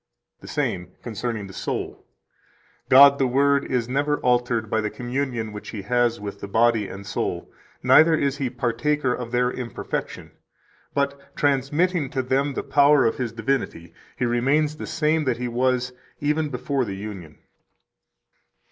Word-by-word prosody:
107 - - -41
The - - -1 0.3
same, - - -37
Concerning 115 -2 -4
the 95 - -11
Soul: - - -4 0.9
"God 140 +1 +8
the 135 - +3
Word 140 +2 +3
is 125 -3 -1
never 145 +3 0
altered 120 -2 +1
by 110 +1 0
the 105 - -2
communion 120 -2 -3
which 105 - -8
He 105 -4 -6
has 120 +1 +1
with 100 -1 -7
the - - -5
body 115 0 +2
and 100 +1 -9
soul, 95 - -3 0.3
neither 160 +1 +6
is 140 -2 0
He 135 -3 -1
partaker 130 +3 0
of 120 -2 -5
their 125 0 +1
imperfection, 125 -2 -5 0.6
but, 140 0 -2
transmitting 145 +3 +1
to 130 -1 -2
them 135 +2 0
the - - -2
power 145 -1 +4
of 115 - +1
His 125 -3 -2
divinity, 115 -8 -3 0.2
He 125 - 0
remains 135 +6 +1
the - - -6
same 155 -1 +1
that 125 -3 0
He 125 0 -3
was 125 +1 0 0.3
even 150 +1 0
before 135 +1 -1
the 100 -4 -5
union." 95 -6 -8
125 Hz, 160 wpm, -23 LUFS, 115-140 Hz, 0.9 s, God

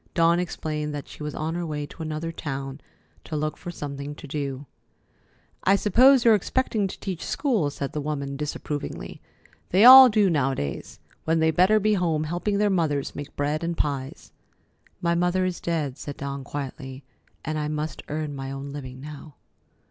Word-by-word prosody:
Dawn 170 0 +4
explained 150 -4 -3
that 145 - -6
she - - -12
was 150 -1 -4
on 160 +1 -2
her 175 +1 -2
way 150 -3 -3
to 160 - -12
another 155 +1 -3
town, 135 -3 -5 0.4
to 160 - -6
look 155 0 -1
for 175 - -8
something 145 -3 -6
to - - -11
do. 140 -1 -4 1.0
"I 195 - +5
suppose 250 +6 +5
you're 230 - +8
expecting 215 0 0
to - - -9
teach 185 -4 -5
school," 240 - 0
said 140 -1 -5
the 150 - -2
woman 140 -2 -3
disapprovingly. 145 - -5 0.5
"They 195 +5 +5
all 260 0 +12
do 210 -2 +3
nowadays, 135 - -2 0.3
when 160 +1 +2
they 160 0 +3
better 185 +6 +4
be 215 +1 +2
home, 165 -5 +1
helping 175 +6 -1
their 205 0 +2
mothers 155 -6 0
make 145 0 -7
bread 150 +3 -1
and 170 0 -2
pies." 140 -2 -3 0.7
"My 170 -1 +2
mother 180 +2 +1
is 180 -2 -3
dead," 150 -6 -2
said 145 - -7
Dawn 140 0 -5
quietly, 135 -1 -6 0.4
"and 155 0 -2
I 150 - -2
must 150 +1 -3
earn 150 -1 -3
my 135 0 -5
own 135 +1 -6
living 130 -2 -8
now." 150 0 -10
155 Hz, 180 wpm, -25 LUFS, 145-175 Hz, 1.0 s, all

